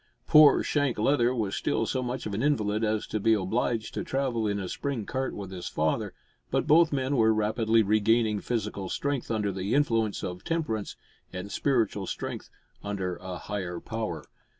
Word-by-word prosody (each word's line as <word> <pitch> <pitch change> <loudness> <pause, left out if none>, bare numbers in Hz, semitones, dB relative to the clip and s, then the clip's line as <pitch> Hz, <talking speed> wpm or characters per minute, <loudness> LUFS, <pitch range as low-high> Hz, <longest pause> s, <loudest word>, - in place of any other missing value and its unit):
Poor 150 -1 +7
Shank 145 -4 0
Leather 120 +2 +3
was 105 -5 -1
still 115 - 0
so 130 +3 -1
much 125 0 -4
of 105 - -4
an 105 - -1
invalid 110 -7 +1
as 110 0 0
to 110 - -3
be 110 +2 +4
obliged 110 +3 -1
to - - -3
travel 130 -5 -1
in 100 -1 -1
a 95 - -4
spring 135 0 -3
cart 130 +4 -3
with 100 -2 -7
his 90 -2 -6
father, 80 0 -1 0.3
but - - 0
both 165 +2 +5
men 135 0 0
were 110 -1 +5
rapidly 110 +1 +2
regaining 110 +1 +2
physical 105 -4 -3
strength 140 -3 -2
under 105 -3 0
the 95 +5 -2
influence 115 -7 +1
of 90 0 -5
temperance, 130 -11 -2 0.4
and 90 +2 -6
spiritual 115 -8 0
strength - - -5 0.3
under 95 -3 -3
a 95 -1 -6
higher 90 -3 -4
power. 110 -1 -4
110 Hz, 175 wpm, -28 LUFS, 100-125 Hz, 0.4 s, Poor